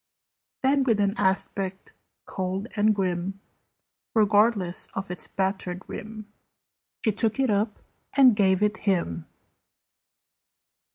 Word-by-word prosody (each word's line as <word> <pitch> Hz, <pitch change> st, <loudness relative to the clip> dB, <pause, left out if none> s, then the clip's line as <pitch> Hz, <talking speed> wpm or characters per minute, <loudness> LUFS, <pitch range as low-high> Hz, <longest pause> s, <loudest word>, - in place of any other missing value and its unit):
Then, 275 Hz, +1 st, +3 dB
with 230 Hz, -5 st, +2 dB
an 200 Hz, -1 st, +2 dB
aspect 190 Hz, -2 st, -2 dB, 0.3 s
cold 190 Hz, +3 st, -3 dB
and 215 Hz, 0 st, +3 dB
grim, 190 Hz, 0 st, -2 dB, 0.8 s
Regardless 210 Hz, -3 st, +3 dB
of 190 Hz, -1 st, -4 dB
its 180 Hz, -, -4 dB
battered 190 Hz, -1 st, -2 dB
rim, 215 Hz, 0 st, -8 dB, 0.8 s
She 220 Hz, -, +4 dB
took 220 Hz, +3 st, 0 dB
it 265 Hz, -4 st, +2 dB
up 210 Hz, +1 st, 0 dB, 0.4 s
and 260 Hz, -5 st, +7 dB
gave 190 Hz, -1 st, +3 dB
it 210 Hz, +1 st, +1 dB
him. 125 Hz, -, -1 dB
200 Hz, 110 wpm, -26 LUFS, 190-215 Hz, 0.8 s, and